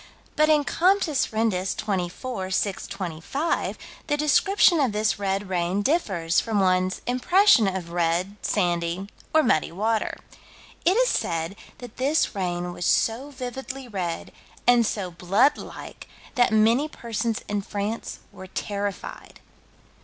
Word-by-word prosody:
But 305 Hz, 0 st, +3 dB
in 300 Hz, -1 st, +4 dB
Comptes 345 Hz, -3 st, +2 dB
Rendus, 215 Hz, -4 st, 0 dB
24 195 Hz, +1 st, -3 dB
625, 195 Hz, -, -2 dB, 0.3 s
the 295 Hz, -, +1 dB
description 340 Hz, +4 st, +4 dB
of 260 Hz, -7 st, +1 dB
this 215 Hz, -1 st, +1 dB
red 195 Hz, 0 st, -1 dB
rain 185 Hz, +2 st, 0 dB
differs 190 Hz, -, +1 dB
from 220 Hz, -3 st, -1 dB
one's 185 Hz, -1 st, +1 dB
impression 255 Hz, -, +4 dB
of 185 Hz, -3 st, -3 dB
red, 175 Hz, +3 st, 0 dB
sandy 175 Hz, 0 st, -1 dB, 0.2 s
or 315 Hz, 0 st, +4 dB
muddy 160 Hz, -12 st, +2 dB
water. 220 Hz, +5 st, -1 dB, 0.7 s
It 370 Hz, +5 st, +4 dB
is -, -, +4 dB
said 165 Hz, +3 st, -1 dB, 0.2 s
that 245 Hz, -3 st, -11 dB
this 280 Hz, +5 st, +1 dB
rain 175 Hz, -3 st, -2 dB
was 175 Hz, -, -6 dB
so 240 Hz, +6 st, +1 dB
vividly 265 Hz, 0 st, -6 dB
red 180 Hz, -6 st, -4 dB, 0.3 s
and 240 Hz, -2 st, +5 dB
so 190 Hz, -5 st, -3 dB
blood 195 Hz, -, +3 dB
like -, -, -10 dB, 0.3 s
that 245 Hz, -2 st, +3 dB
many 225 Hz, +7 st, +4 dB
persons 230 Hz, -3 st, -3 dB
in 205 Hz, 0 st, -1 dB
France 205 Hz, +3 st, -4 dB
were 190 Hz, -, -11 dB
terrified. 200 Hz, +1 st, -5 dB
210 Hz, 130 wpm, -25 LUFS, 185-260 Hz, 0.7 s, and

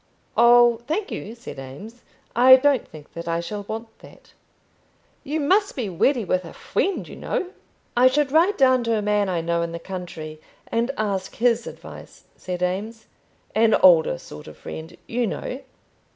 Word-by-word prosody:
"Oh, 240 Hz, 0 st, +6 dB
thank 370 Hz, +7 st, -2 dB
you," 220 Hz, +3 st, -6 dB
said 235 Hz, -, -10 dB
Eames, 175 Hz, -, -10 dB, 0.3 s
"I 255 Hz, +2 st, +9 dB
don't 275 Hz, 0 st, +2 dB
think 150 Hz, -2 st, -14 dB
that 170 Hz, 0 st, -7 dB
I 165 Hz, 0 st, 0 dB
shall 205 Hz, +5 st, -5 dB
want 225 Hz, +1 st, -7 dB
that." -, -, -17 dB, 0.9 s
"You 300 Hz, +3 st, -2 dB
must 390 Hz, +8 st, +2 dB
be 235 Hz, -7 st, -3 dB
ready 230 Hz, -, +1 dB
with 185 Hz, 0 st, 0 dB
a 165 Hz, -, -10 dB
friend, 390 Hz, -, -2 dB
you -, -, -10 dB
know." 370 Hz, -, -3 dB, 0.4 s
"I 245 Hz, +1 st, +6 dB
should 275 Hz, +1 st, +1 dB
write 340 Hz, +7 st, +3 dB
down 260 Hz, -3 st, +4 dB
to 230 Hz, -1 st, +1 dB
a -, -, -1 dB
man 205 Hz, -1 st, +1 dB
I 175 Hz, -2 st, -1 dB
know 170 Hz, +1 st, 0 dB
in 170 Hz, 0 st, -3 dB
the -, -, -3 dB
country, 165 Hz, -4 st, -8 dB, 0.2 s
and 235 Hz, +2 st, -1 dB
ask 200 Hz, -3 st, -2 dB
his 235 Hz, 0 st, +1 dB
advice," -, -, -11 dB
said 180 Hz, -1 st, -5 dB
Eames; 210 Hz, +5 st, -3 dB, 0.5 s
"an 225 Hz, 0 st, +4 dB
older 160 Hz, -, +5 dB
sort 75 Hz, 0 st, -12 dB
of 75 Hz, -, -12 dB
friend, 160 Hz, +1 st, -9 dB
you 240 Hz, 0 st, -1 dB
know." 255 Hz, +6 st, -5 dB
220 Hz, 175 wpm, -23 LUFS, 175-255 Hz, 0.9 s, I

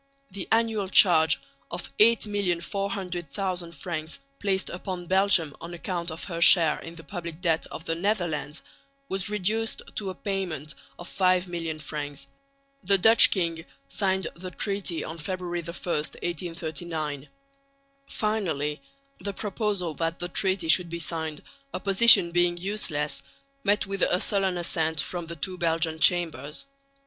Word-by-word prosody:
The 190 Hz, -1 st, -6 dB
annual 225 Hz, -3 st, +1 dB
charge 165 Hz, -5 st, +6 dB, 0.3 s
of -, -, -6 dB
8,400,000 190 Hz, -4 st, 0 dB
francs 160 Hz, +1 st, -4 dB, 0.2 s
placed 195 Hz, -2 st, -1 dB
upon 180 Hz, 0 st, -5 dB
Belgium 185 Hz, -5 st, +3 dB
on 170 Hz, +1 st, -7 dB
account 175 Hz, 0 st, -3 dB
of 160 Hz, 0 st, -6 dB
her 170 Hz, -3 st, -5 dB
share 165 Hz, -1 st, +6 dB
in 165 Hz, +1 st, -9 dB
the 165 Hz, -, -11 dB
public 170 Hz, -4 st, -7 dB
debt 165 Hz, -3 st, +1 dB
of 165 Hz, -, -9 dB
the 165 Hz, -, -1 dB
Netherlands 170 Hz, -5 st, -1 dB, 0.5 s
was 190 Hz, +1 st, -2 dB
reduced 210 Hz, +2 st, -1 dB
to 200 Hz, -2 st, -2 dB
a 185 Hz, -, -6 dB
payment 175 Hz, -8 st, -3 dB, 0.2 s
of 175 Hz, -, -9 dB
5,000,000 180 Hz, -4 st, 0 dB
francs. 145 Hz, -2 st, -5 dB, 0.6 s
The 195 Hz, +2 st, +6 dB
Dutch 225 Hz, +5 st, +7 dB
king 165 Hz, -4 st, -1 dB, 0.3 s
signed 190 Hz, -2 st, 0 dB
the 185 Hz, +2 st, -8 dB
treaty 195 Hz, -2 st, -2 dB
on 165 Hz, +1 st, -7 dB
February 175 Hz, +1 st, -3 dB
1, 170 Hz, -, -12 dB
1839. 160 Hz, -3 st, -3 dB, 0.8 s
Finally 170 Hz, -9 st, -2 dB, 0.4 s
the 200 Hz, -, -4 dB
proposal 200 Hz, -4 st, -2 dB
that 165 Hz, +2 st, -2 dB
the 175 Hz, -, -4 dB
treaty 190 Hz, -2 st, 0 dB
should 175 Hz, +1 st, +5 dB
be 170 Hz, -, -4 dB
signed, 160 Hz, -2 st, -4 dB, 0.3 s
opposition 195 Hz, -3 st, +7 dB
being 175 Hz, 0 st, +2 dB
useless, 175 Hz, -6 st, 0 dB, 0.4 s
met 205 Hz, -2 st, +2 dB
with 195 Hz, -1 st, -5 dB
a 180 Hz, -, +3 dB
sullen 195 Hz, -3 st, 0 dB
assent 160 Hz, -2 st, 0 dB
from 175 Hz, +3 st, -3 dB
the 170 Hz, -, -6 dB
two 180 Hz, +4 st, -4 dB
Belgian 165 Hz, -1 st, 0 dB
Chambers. 155 Hz, -, +2 dB
175 Hz, 135 wpm, -26 LUFS, 165-195 Hz, 0.8 s, Dutch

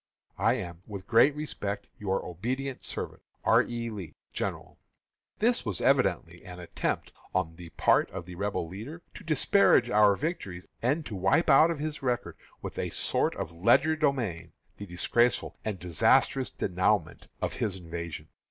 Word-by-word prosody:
I 115 Hz, -, +4 dB
am, 85 Hz, -7 st, -6 dB
with 100 Hz, -3 st, -7 dB
great 135 Hz, +5 st, +5 dB
respect, 100 Hz, -9 st, -4 dB
your 95 Hz, -2 st, -1 dB
obedient 125 Hz, +10 st, -4 dB
servant, -, -, -5 dB, 0.2 s
R. -, -, +5 dB
E. 120 Hz, -1 st, -4 dB
LEE, 90 Hz, -8 st, -8 dB, 0.2 s
General. -, -, -4 dB, 0.6 s
This 235 Hz, +3 st, +2 dB
was 105 Hz, -7 st, -2 dB
evidently 85 Hz, +1 st, +1 dB
an 90 Hz, -2 st, -9 dB
attempt, 90 Hz, -, -3 dB, 0.2 s
on 85 Hz, -3 st, 0 dB
the 85 Hz, 0 st, -10 dB
part -, -, +3 dB
of 90 Hz, -2 st, -7 dB
the 90 Hz, -, -9 dB
Rebel 100 Hz, -2 st, -2 dB
leader, 115 Hz, -, -8 dB
to -, -, -11 dB
disparage 155 Hz, -4 st, +4 dB
our 105 Hz, -1 st, +5 dB
victories 100 Hz, -, -4 dB, 0.2 s
and 145 Hz, +6 st, +1 dB
to 110 Hz, -, -6 dB
wipe 95 Hz, -, +3 dB
out 155 Hz, +4 st, +7 dB
of 170 Hz, -, -1 dB
his 150 Hz, +1 st, -4 dB
record, 120 Hz, -10 st, -1 dB, 0.3 s
with -, -, -5 dB
a -, -, -1 dB
sort -, -, +1 dB
of -, -, -4 dB
legerdemain, 115 Hz, -, +1 dB, 0.2 s
the 100 Hz, -, -8 dB
disgraceful 105 Hz, +6 st, +1 dB
and 105 Hz, -3 st, -3 dB
disastrous 90 Hz, -, +2 dB
denouement 90 Hz, -1 st, 0 dB
of -, -, -2 dB
his 100 Hz, -4 st, -1 dB
invasion. 85 Hz, -3 st, -7 dB
105 Hz, 155 wpm, -29 LUFS, 90-135 Hz, 0.6 s, out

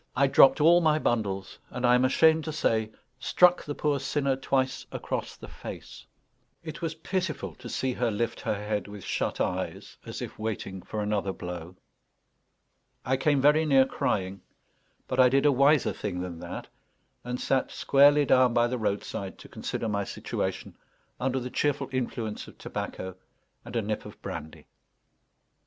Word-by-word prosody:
I 140 Hz, -, +4 dB
dropped 135 Hz, 0 st, +6 dB
all 170 Hz, +3 st, +6 dB
my 155 Hz, -2 st, +3 dB
bundles, 100 Hz, -9 st, -1 dB
and, 125 Hz, 0 st, -3 dB
I 120 Hz, -, +5 dB
am 125 Hz, +1 st, +4 dB
ashamed 160 Hz, +4 st, +4 dB
to 160 Hz, -, -3 dB
say, 110 Hz, -7 st, 0 dB, 0.3 s
struck 180 Hz, +6 st, +4 dB
the 145 Hz, -, -5 dB
poor 145 Hz, -2 st, 0 dB
sinner 140 Hz, 0 st, 0 dB
twice 135 Hz, 0 st, -1 dB
across -, -, -4 dB
the -, -, -11 dB
face. -, -, -10 dB, 0.6 s
It 155 Hz, -2 st, -7 dB
was 165 Hz, -1 st, -2 dB
pitiful 175 Hz, -1 st, -3 dB
to 125 Hz, -1 st, -9 dB
see 130 Hz, +1 st, -1 dB
her 120 Hz, -1 st, 0 dB
lift 115 Hz, +2 st, -2 dB
her -, -, -1 dB
head 105 Hz, 0 st, -3 dB
with 100 Hz, -2 st, -9 dB
shut -, -, -2 dB
eyes, -, -, -3 dB
as -, -, -7 dB
if -, -, -7 dB
waiting 105 Hz, -3 st, -4 dB
for 105 Hz, +2 st, -4 dB
another 105 Hz, -2 st, 0 dB
blow. 90 Hz, -1 st, -7 dB, 1.3 s
I 130 Hz, -, +2 dB
came 140 Hz, +1 st, +2 dB
very 150 Hz, +3 st, +5 dB
near 135 Hz, -4 st, +5 dB
crying, 95 Hz, -6 st, -2 dB, 0.7 s
but 130 Hz, -, -2 dB
I 125 Hz, -1 st, +7 dB
did 135 Hz, +3 st, +2 dB
a 145 Hz, -, +6 dB
wiser 140 Hz, +2 st, +4 dB
thing 90 Hz, -4 st, -4 dB
than 90 Hz, -2 st, -6 dB
that, -, -, -6 dB, 0.6 s
and 125 Hz, 0 st, -4 dB
sat 135 Hz, -1 st, +1 dB
squarely 145 Hz, +1 st, +5 dB
down 130 Hz, -2 st, +4 dB
by 120 Hz, -, +4 dB
the 125 Hz, +1 st, -2 dB
roadside 100 Hz, -2 st, -3 dB
to -, -, -12 dB
consider -, -, -4 dB
my 100 Hz, -2 st, 0 dB
situation -, -, -4 dB, 0.4 s
under 130 Hz, +1 st, 0 dB
the 125 Hz, 0 st, -6 dB
cheerful 145 Hz, -2 st, 0 dB
influence 120 Hz, -4 st, -3 dB
of -, -, -14 dB
tobacco 95 Hz, 0 st, -5 dB, 0.5 s
and -, -, -9 dB
a 115 Hz, -, +1 dB
nip 105 Hz, +1 st, -3 dB
of -, -, -13 dB
brandy. 75 Hz, +1 st, -7 dB
125 Hz, 170 wpm, -28 LUFS, 105-140 Hz, 1.3 s, I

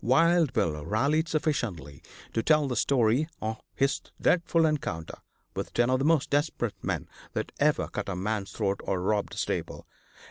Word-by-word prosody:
Wild 165 Hz, +4 st, +4 dB
Bill 80 Hz, -, 0 dB
rallied 140 Hz, -, +1 dB
sufficiently 110 Hz, -, -2 dB, 0.3 s
to 115 Hz, -, +1 dB
tell 150 Hz, +2 st, +3 dB
the 125 Hz, -, -2 dB
story 125 Hz, +4 st, +2 dB
of 110 Hz, 0 st, -3 dB
his 135 Hz, +1 st, +1 dB, 0.2 s
dreadful 170 Hz, -2 st, +3 dB
encounter 125 Hz, -, -2 dB, 0.4 s
with -, -, -4 dB
ten 120 Hz, +1 st, +3 dB
of 130 Hz, -, +3 dB
the 135 Hz, -, 0 dB
most 160 Hz, -3 st, +3 dB
desperate 145 Hz, -6 st, 0 dB
men -, -, -2 dB, 0.3 s
that -, -, -3 dB
ever -, -, +2 dB
cut -, -, -4 dB
a 95 Hz, -, -2 dB
man's 100 Hz, +2 st, -2 dB
throat 100 Hz, -2 st, -1 dB
or 95 Hz, -, -1 dB
robbed 100 Hz, +2 st, 0 dB
a -, -, -12 dB
stable. -, -, -3 dB
125 Hz, 170 wpm, -28 LUFS, 100-155 Hz, 0.4 s, Wild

